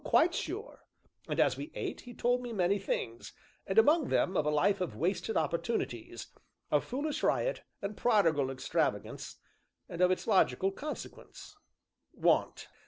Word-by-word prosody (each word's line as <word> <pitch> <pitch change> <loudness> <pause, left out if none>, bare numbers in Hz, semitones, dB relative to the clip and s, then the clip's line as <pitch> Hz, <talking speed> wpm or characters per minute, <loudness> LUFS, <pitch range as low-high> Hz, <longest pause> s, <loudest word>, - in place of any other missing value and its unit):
"Quite 345 +1 +4
sure. 395 +9 -5 0.5
And, - - -2
as - - +3
we - - -6
ate, - - -4
he 245 -1 -11
told 245 +1 +1
me 245 -1 -6
many 195 0 +2
things, 115 -11 -4 0.3
and 190 - -2
among 295 +6 +5
them 185 - +1
of 150 - +1
a - - +4
life 185 +7 +2
of 180 - -2
wasted 180 +5 -1
opportunities 160 - -2 0.5
of 150 - +3
foolish 285 +4 -3
riot, - - +1 0.2
and 200 +1 -3
prodigal 165 - +3
extravagance, 135 -1 -2 0.5
and 170 - -5
of 180 - +6
its 185 - 0
logical 195 0 +3
consequence 300 - -8 0.6
want." - - +1
195 Hz, 150 wpm, -31 LUFS, 170-245 Hz, 0.6 s, of